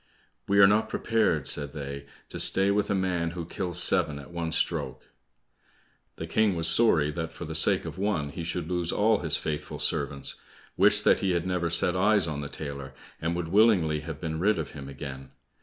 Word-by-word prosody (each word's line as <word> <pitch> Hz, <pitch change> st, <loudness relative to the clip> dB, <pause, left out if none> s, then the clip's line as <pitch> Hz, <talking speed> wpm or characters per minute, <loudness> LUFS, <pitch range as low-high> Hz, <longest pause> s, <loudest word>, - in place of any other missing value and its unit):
"We 100 Hz, -, +1 dB
are 100 Hz, -, +8 dB
not 105 Hz, +3 st, +2 dB
prepared," 105 Hz, -, 0 dB
said 70 Hz, 0 st, -1 dB
they, 70 Hz, -1 st, -7 dB, 0.2 s
"to -, -, -6 dB
stay 95 Hz, +1 st, +3 dB
with 105 Hz, 0 st, 0 dB
a 100 Hz, -, +1 dB
man 90 Hz, -3 st, -1 dB
who 85 Hz, -, -4 dB
kills 90 Hz, 0 st, -3 dB
seven 85 Hz, -5 st, +1 dB
at 70 Hz, +3 st, -11 dB
one 85 Hz, -1 st, -4 dB
stroke." -, -, -2 dB, 1.1 s
The -, -, -6 dB
King 110 Hz, -4 st, +1 dB
was 80 Hz, -1 st, +1 dB
sorry 80 Hz, -6 st, +4 dB
that 80 Hz, +1 st, -5 dB
for -, -, -8 dB
the -, -, -6 dB
sake -, -, +3 dB
of -, -, -7 dB
one 95 Hz, -8 st, -1 dB
he 85 Hz, +4 st, -7 dB
should 80 Hz, -1 st, -3 dB
lose 90 Hz, -1 st, -2 dB
all 105 Hz, 0 st, +2 dB
his 80 Hz, -4 st, +2 dB
faithful 75 Hz, -2 st, -5 dB
servants, 70 Hz, -1 st, -2 dB, 0.4 s
wished 105 Hz, +2 st, +4 dB
that -, -, +4 dB
he 95 Hz, -2 st, 0 dB
had 85 Hz, 0 st, -1 dB
never 90 Hz, -2 st, -1 dB
set 90 Hz, +1 st, +2 dB
eyes 100 Hz, 0 st, +3 dB
on 75 Hz, -3 st, -4 dB
the 70 Hz, -, -6 dB
tailor, 70 Hz, -3 st, -7 dB, 0.3 s
and 80 Hz, +1 st, -1 dB
would 85 Hz, -2 st, -4 dB
willingly 95 Hz, -7 st, +3 dB
have 75 Hz, -1 st, -8 dB
been 80 Hz, -1 st, -4 dB
rid 105 Hz, +4 st, +2 dB
of 80 Hz, -, -5 dB
him 70 Hz, -2 st, -9 dB
again. 65 Hz, -1 st, -8 dB
85 Hz, 205 wpm, -27 LUFS, 75-95 Hz, 1.1 s, are